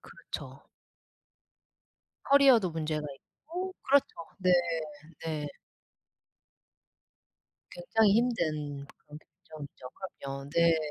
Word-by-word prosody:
그렇죠. - - -9 1.6
커리어도 265 -9 +6
문제가 155 -2 -2
있고 360 - -7
그렇죠. 275 +1 +5 0.3
네. 185 -1 +2 0.8
네. 155 -2 -2 2.2
굉장히 205 +3 +3
힘든 155 - 0
그런 150 +1 -14
결정이죠. 145 -4 -11
그럼요. 140 -7 -7
네. 170 -1 +5
165 Hz, 175 characters per minute, -30 LUFS, 150-230 Hz, 2.2 s, 커리어도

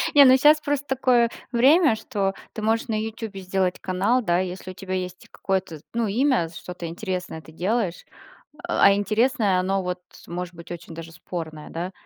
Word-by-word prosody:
Не, 285 - +10
ну 260 0 +7
щас 300 +3 +6
просто 290 -1 -1
такое 250 -3 +3 0.2
время, 275 +3 +5
что 200 -4 -2 0.2
ты 220 - -5
можешь 225 +2 +1
на 220 - -1
"Ютубе" 220 -2 -5
сделать 185 -1 -1
канал, 195 +7 +1
да, 175 -3 +2
если 185 0 -4
у - - -10
тебя 185 0 -6
есть 180 -1 -4
какое-то, 190 -5 -3
ну, 230 -1 0
имя, 235 - +2
что-то 175 +1 -7
интересное 180 -2 -4
ты 155 - -15
делаешь, 185 +2 -1
э, - - -21 0.4
а - - +5
интересное, 210 -1 +2
оно, 190 +1 0
вот, 180 0 -3 0.3
может 175 0 -5
быть 170 +1 -12
очень 170 -1 -8
даже 165 0 -9
спорное, 155 -1 -7
да? 175 +3 -4
190 Hz, 180 wpm, -24 LUFS, 180-235 Hz, 0.4 s, Не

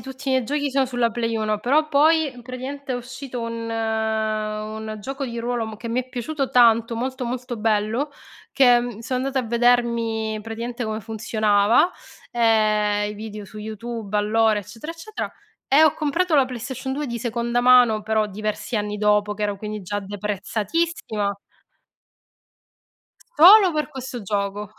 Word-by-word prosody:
tutti 265 +1 -7
i - - +2
miei 260 -2 +2
giochi 285 +2 -1
sono 270 0 +2
sulla 245 -2 0
Play 230 0 -2
1; 215 -1 0
però 300 +7 +2
poi 310 +1 +4
praticamente 260 +2 -6
è - - -1
uscito 255 +1 -6
un 230 0 -4
un 220 -1 -2
gioco 270 +5 -5
di 235 -2 -5
ruolo 235 -1 -2
m 220 - -7
che 230 - -7
mi 235 +2 -1
è 255 - -21
piaciuto 270 +3 -3
tanto, 230 -1 +4
molto, 255 +2 -3
molto 245 0 -4
bello, 220 +6 0 0.4
che, 250 -3 +6
mhmm, 240 -3 -5
sono 250 +2 -2
andata 265 -2 -1
a - - -8
vedermi 235 -2 +1
praticamente 235 +2 -5
come 220 0 -3
funzionava, 215 - +2 0.4
ehm, 215 -3 +2
i - - -7
video 210 -1 -7
su 215 +2 -11
YouTube, 220 0 -5
allora, 215 0 +2
eccetera 225 - -8
eccetera, 420 +6 -6 0.3
e 285 +4 +5
ho 315 - +6
comprato 310 +2 +1
la 270 - +5
PlayStation 255 +1 -5
2 290 +1 -3
di 235 0 -3
seconda 235 +1 -1
mano, 245 -3 +5
però 220 0 +1
diversi 215 +3 -4
anni 210 0 -2
dopo 210 0 +2
che 210 - -5
ero, 205 -1 -1
quindi 210 0 -6
già 205 +3 -3
deprezzatissima. 205 - -2 2.0
Solo 370 +3 +8
per 305 0 -1
questo 255 -3 -7
gioco. 200 +1 -3
230 Hz, 160 wpm, -23 LUFS, 215-255 Hz, 2.0 s, Solo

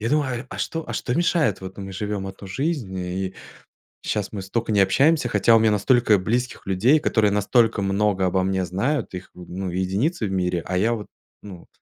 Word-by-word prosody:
Я 115 - -2
думаю: 135 -4 0
а - - -7
что 165 -1 -3
а - - -3
что, 125 - -2
мешает? 170 -1 +1
Вот, 95 +1 -8
ну, 100 - -5
мы 95 - -8
живём 100 0 -3
1 95 +1 -9
жизнь, 135 - -2
и 95 +1 -3 0.7
щас 105 -2 -2
мы 100 -3 -5
столько 110 +4 -2
не 100 - +3
общаемся, 140 - +3
хотя 115 -1 +4
у - - +6
меня 110 0 +4
настолько 105 0 +3
близких 120 +6 -2
людей, 105 +11 +3
которые 110 -7 +2
настолько 110 +1 +2
много 100 -1 +1
обо 95 +1 +1
мне 95 0 0
знают, 115 - -1
их 90 - -7
в 90 -1 -12
ну, 95 +1 -4
единицы 100 - -1
в 95 - -4
мире, 90 -2 0
а 90 - -2
я 110 +4 +2
вот, 105 -3 -6 0.4
ну 95 -4 -11
105 Hz, 210 wpm, -23 LUFS, 95-120 Hz, 0.7 s, у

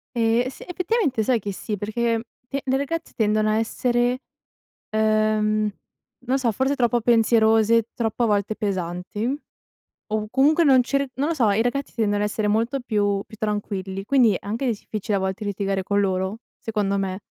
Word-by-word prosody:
Ehm, 235 +1 +2
s 260 - -9
effettivamente 355 - 0
sai 245 +1 +2
che 205 0 -4
sì, 210 +2 -4
perché, 210 +4 -4
ehm, 225 - 0 0.3
le 275 0 -2
le 265 0 +2
ragazze 325 +4 -3
tendono 215 -1 +2
a 215 - +2
essere, 240 +2 +1 0.7
ehm, 215 0 +2 0.6
non 260 +2 +2
so, 250 -3 +1
forse 265 +6 +1
troppo 240 -1 +2
pensierose, 225 -1 +4
troppo 230 +1 -1
a - - +4
volte 210 0 0
pesanti, 195 +6 -2 0.7
o 215 0 -2
comunque 300 +5 +4
non 265 -4 +6
cer 275 +1 0
non 280 +5 -1
lo 335 - 0
so, 230 -7 +3
i 205 +3 +2
ragazzi 275 +3 -2
tendono 205 -3 +1
a - - +2
essere 210 0 -2
molto 230 +6 +1
più 205 -4 0
più 220 - -13
tranquilli, 200 -2 -3
quindi 240 -5 +4
è - - -2
anche 230 +6 -2
difficile 210 -2 -2
a - - 0
volte 190 +3 -3
litigare 195 -1 -1
con 200 +2 0
loro, 190 +1 -1 0.2
secondo 210 -3 -1
me. 190 -1 -2
220 Hz, 175 wpm, -23 LUFS, 205-245 Hz, 0.7 s, non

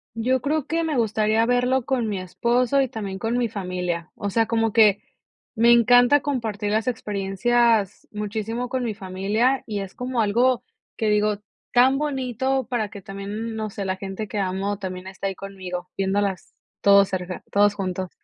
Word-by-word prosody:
Yo 250 +3 +1
creo 300 0 0
que 330 +1 0
me 315 -2 -1
gustaría 220 -1 +2
verlo 250 +1 +2
con 255 -4 0
mi 205 -3 -2
esposo 240 +8 +1
y 265 - +1
también 205 -6 -5
con 225 +4 -2
mi 245 -2 +1
familia, 180 -4 -3
o 205 - -3
sea, 225 +3 +2
como 225 -1 +1
que, 210 -2 +5 0.5
me 235 +1 +5
encanta 245 +4 +6
compartir 225 -7 -2
las 220 +2 0
experiencias 215 0 +1
muchísimo 220 +3 -3
con 260 -1 -1
mi 230 -3 -2
familia, 205 +7 0
y 210 -2 -3
es 195 -1 -8
como 250 -1 -1
algo 240 +4 +2 0.3
que, 220 - 0
digo, 210 0 +2 0.3
tan 255 +2 +5
bonito 265 -2 -1
para 235 -4 -1
que 200 - -10
también, 205 +4 -5
no 215 -1 -3
sé, 200 0 -5
la 190 0 -2
gente 195 +2 -5
que 205 - -3
amo 195 +1 -1
también 185 -2 -6
esté 190 +1 -5
ahí 195 - -3
conmigo 185 -2 -7
viéndolas 195 -1 -1 0.3
todos 200 -1 +6
cerca, 180 -1 -4
todos 205 0 +4
juntos. 185 -2 -3
215 Hz, 175 wpm, -23 LUFS, 195-245 Hz, 0.5 s, encanta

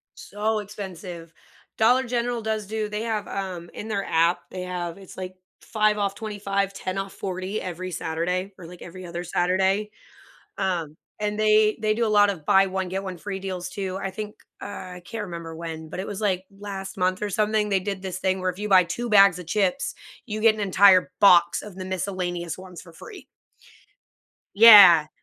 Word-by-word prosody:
So 215 +2 -2
expensive. 185 -5 -8 0.4
Dollar 245 +4 +4
General 240 -1 -2
does 220 -1 -2
do 215 0 -3
they 210 +1 -3
have, 220 -3 -2
um 185 -3 -5
in 215 - -7
their 200 -3 -2
app, 165 +2 +2
they 185 -1 -5
have 175 -1 -5
it's, 195 -2 -13
like, 185 0 -6 0.3
5 215 -1 +1
off 200 -1 -1
25, 200 -2 -2
10 185 -1 -5
off 195 0 -4
40 190 +2 -4
every 185 +1 -5
Saturday 175 +4 -2
or, 180 - -11
like, 175 +1 -13
every 185 +2 -9
other 175 0 -5
Saturday. 190 +4 0 0.7
Um, 170 -6 -2 0.2
and 210 0 -2
they 215 0 +3
they 215 0 +1
do 230 +1 0
a - - 0
lot 205 -1 +5
of 170 -6 -7
buy 195 +5 +5
one, 190 -1 -3
get 190 +1 -3
one 185 -2 -5
free 195 +2 -5
deals 185 -2 -5
too, 190 -2 -4
I 195 - -2
think, 210 +2 -7 0.3
uh - - -4 0.3
I 180 - -12
can't 220 +2 -5
remember 170 -3 -7
when, 160 -1 -7
but 185 - -6
it 195 - -5
was, 205 0 -6
like, 190 -3 0
last 195 -1 -7
month 185 +1 0
or 210 - -2
something, 210 +1 +1
they 195 -2 +1
did 195 0 -4
this 185 -1 -5
thing 190 0 0
where 185 0 0
if 180 - -11
you 210 +1 -3
buy 185 -2 +6
2 240 +8 -4
bags 195 -4 +6
of 180 - -9
chips, 200 - 0 0.3
you 215 -2 -4
get 220 0 +5
an 215 - -7
entire 190 -2 +5
box 175 -3 +5
of 210 -3 -10
the 185 - -6
miscellaneous 180 -2 -3
ones 185 -2 -11
for 170 - -15
free. 380 - -12 1.3
Yeah. 200 -8 +9
195 Hz, 195 wpm, -24 LUFS, 180-210 Hz, 1.3 s, Yeah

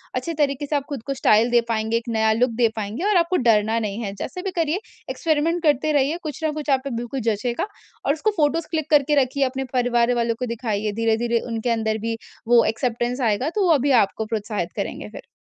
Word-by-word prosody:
अच्छे 255 +7 -2
तरीके 290 -1 0
से 295 - -1
आप 285 - 0
खुद 275 -6 -5
को 275 - 0
स्टाइल 230 -2 +4
दे 240 -1 +5
पाएँगे, 220 0 0
एक 235 +1 -6
नया 220 -1 +2
लुक 245 +2 +2
दे 235 -2 +4
पाएँगे 215 - -4
और 405 - +4
आपको 350 +1 +2
डरना 225 -1 +3
नहीं 215 0 -3
है 200 -2 -4
जैसे 365 - -5
भी 385 - -2
करिए 330 +2 +1 0.3
एक्सपेरिमेंट 325 +2 0
करते 300 0 +2
रहिए 285 +3 +2
कुछ 305 +1 -6
ना 315 - +1
कुछ 300 -1 -5
आप 265 -1 +3
पे - - -2
बिल्कुल 240 +2 -4
जँचेगा। 235 - -1 0.4
और 280 - +3
उसको 400 +8 0
फोटोज़ 310 +2 +1
क्लिक 315 -2 -2
करके 295 0 +4
रखिए 275 +2 -1
अपने 265 +1 -2
परिवार 245 -1 +2
वालों 235 -1 0
को 250 - -1
दिखाइए, 220 -3 -2
धीरे-धीरे 230 +2 +1
उनके 230 +1 -2
अंदर 220 -1 0
भी 225 - -2 0.3
वो 240 -1 +6
एक्सेप्टेंस 240 +2 -1
आएगा 255 +9 0
तो 410 - +2
वो 335 - +5
अभी 280 0 +1
आपको 210 +3 -4
प्रोत्साहित 210 -5 -3
करेंगे - - -4
फिर। - - -11
245 Hz, 220 wpm, -22 LUFS, 225-295 Hz, 0.4 s, वो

